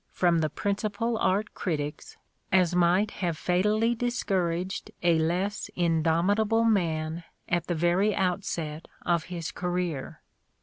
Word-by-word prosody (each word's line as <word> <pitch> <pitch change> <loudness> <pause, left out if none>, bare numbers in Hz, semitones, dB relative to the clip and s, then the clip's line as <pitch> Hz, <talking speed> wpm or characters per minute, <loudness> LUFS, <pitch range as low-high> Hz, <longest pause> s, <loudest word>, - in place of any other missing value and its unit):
from 175 -2 +2
the 155 -1 +1
principal 205 +6 -1
art 200 +3 +1
critics 150 -5 -4 0.3
as 180 -2 +4
might 180 +4 +3
have 170 -4 -2
fatally 210 +7 +2
discouraged 190 -7 -1
a 170 -2 +4
less 180 +6 -1
indomitable 175 +7 +2
man 165 -6 0 0.2
at 175 -1 0
the 175 - 0
very 175 +5 +2
outset 175 -4 -2 0.2
of 170 -2 +1
his 170 -3 -5
career. 175 -5 -3
180 Hz, 120 wpm, -27 LUFS, 165-200 Hz, 0.3 s, as